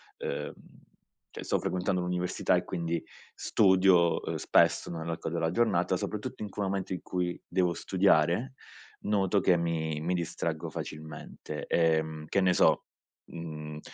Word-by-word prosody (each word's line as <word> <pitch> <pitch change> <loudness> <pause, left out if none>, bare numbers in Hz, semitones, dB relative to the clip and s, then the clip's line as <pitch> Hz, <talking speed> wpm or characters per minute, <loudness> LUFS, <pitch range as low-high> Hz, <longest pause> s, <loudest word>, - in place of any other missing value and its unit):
ehm, - - -4 0.8
cioè - - -8
sto - - 0
frequentando 90 0 -1
l'università 90 0 0
e - - +1
quindi 85 -1 -2 0.3
studio, 95 -3 +4
ehm, - - -3
spesso - - +3
nell'arco 80 -1 -4
della 80 0 -1
giornata, 115 +3 +2
soprattutto - - -5
in 105 - -4
quel 100 0 -3
momento 95 -1 -2
in 90 - -4
cui 90 -1 -2
devo 90 -1 +1
studiare, 95 +7 +2 0.5
noto 100 -1 +1
che 90 -2 +4
mi 80 -2 -1
mi 85 +4 -1
distraggo 85 -2 -2
facilmente 80 0 -7
e, 80 -2 +3
mhmm, 80 -1 -7
che 100 - +1
ne 90 -1 +4
so, - - +4 0.5
mhmm, 75 -2 -7
85 Hz, 140 wpm, -29 LUFS, 80-95 Hz, 0.8 s, studio